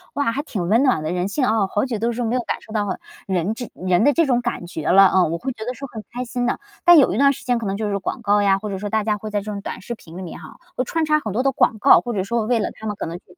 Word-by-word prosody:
“哇， 285 -5 +1
还 280 - -1
挺 195 - -4
温 225 +7 +4
暖 255 - +2
的， 155 +1 -3
人 180 +1 -1
性 255 +6 0
哦， 215 -4 +1
好 205 - +1
久 245 -4 -3
都 230 +3 0
是 240 +1 -3
没 230 +2 0
有 250 - +1
感 - - -3
受 220 - -12
到 205 -3 -1 0.3
人 190 +1 0
这 240 0 -7
人 185 +2 +1
的 290 - +5
这 330 +2 +3
种 245 -3 +2
感 240 -7 -3
觉 160 -3 -4
了”， 195 +1 +7
嗯， 180 -4 +3
我 170 - -1
会 265 +7 -4
觉 220 - -8
得 250 - -3
是 275 - -8
很 220 -2 -7
开 250 +1 -4
心 245 0 -2
的。 245 - -1 0.2
但 350 -1 +8
有 265 - +4
一 - - -2
段 280 +2 +5
时 280 - -8
间 245 -1 +2
可 230 - -4
能 195 0 -2
就 215 -1 -2
是 200 0 -1
广 240 - -4
告 205 -1 +3
呀， 195 -1 +3
或 210 +1 -5
者 195 - -3
说 205 +2 -4
大 220 +1 0
家 210 -1 +1
会 215 +1 -7
在 205 -1 -1
这 200 - -9
种 200 -1 -4
短 - - -6
视 235 +5 -5
频 170 -5 -13
里 - - -6
面 175 - -8
哈， 155 - -12 0.2
会 255 - 0
穿 320 +5 -1
插 305 0 +3
很 215 - -4
多 245 +5 0
的 275 - +3
广 225 - +2
告。 275 - +7
或 240 - -4
者 195 -3 -1
说 225 +3 -1
为 240 +1 +1
了 210 - -1
他 220 - -8
们 210 - -2
可 - - -5
能 165 +1 -5
是 180 - -19
220 Hz, 370 characters per minute, -21 LUFS, 195-245 Hz, 0.3 s, 但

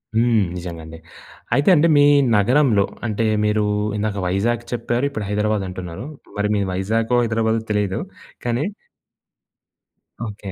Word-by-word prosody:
హ్మ్. 120 +1 +3 0.2
నిజంగండి. 85 -2 -8 0.6
అయితే 145 +6 +3
అండి 165 +2 +4
మీ 145 - +6 0.3
నగరంలో 110 -1 +3 0.2
అంటే 110 0 -1 0.2
మీరు 105 0 +1 0.3
ఇందాక 105 -1 -2
వైజాగ్ 115 +6 0
చెప్పారు 120 +2 -1
ఇప్పుడు 110 -7 -5
హైదరాబాద్ 105 0 0
అంటున్నారు. 90 +3 -7 0.3
మరి 105 0 0
మీరు 100 -2 0
వైజాగో, 115 +6 0
హైదరాబాదో 110 0 0
తెలియదు. 105 -2 0 0.5
కానీ 120 +3 0 1.6
ఓకే. 105 -3 -7
105 Hz, 120 wpm, -21 LUFS, 100-120 Hz, 1.6 s, మీ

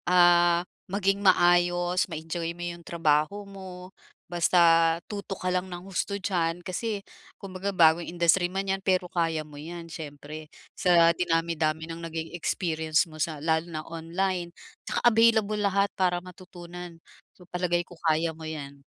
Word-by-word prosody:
ah, 175 -1 +5 0.3
maging 195 0 0
maayos, 175 -1 +3
ma-enjoy 165 +1 -4
mo 175 - -7
'yung 170 0 -6
trabaho 165 +5 0
mo, 190 -1 -10 0.3
basta 175 +1 +2 0.5
tutok 200 -2 -6
ka - - +2
lang 180 +1 -1
ng 175 +1 -8
husto 195 +1 -2
diyan. 170 -4 -1
Kasi, 205 +2 -3 0.3
kumbaga 195 0 -4
bagong 170 -2 +4
industry 175 +1 +2
man 195 +1 -3
'yan, 195 0 -1
pero 185 -2 +1
kaya 165 -3 -1
mo 150 - -15
'yan 170 +1 -8
siyempre. 155 -1 -9 0.2
Sa 170 -2 +4
dinami-dami 165 -2 0
ng 165 0 -7
naging 165 -1 -5
experience 160 -2 0
mo 155 -1 -5
sa 155 -2 -2
lalo 160 +3 0
na 155 -1 -5
online. 170 +2 -2 0.3
'Tsaka - - -2
available 220 -2 +4
lahat 200 0 +2
para 180 -2 +1
matutunan, 175 -1 -10 0.3
so, 180 - -19
palagay 175 -1 -1
ko - - -13
kaya 160 0 +1
mo 160 - -13
yan. 150 -3 -6
175 Hz, 150 wpm, -27 LUFS, 165-185 Hz, 0.5 s, ah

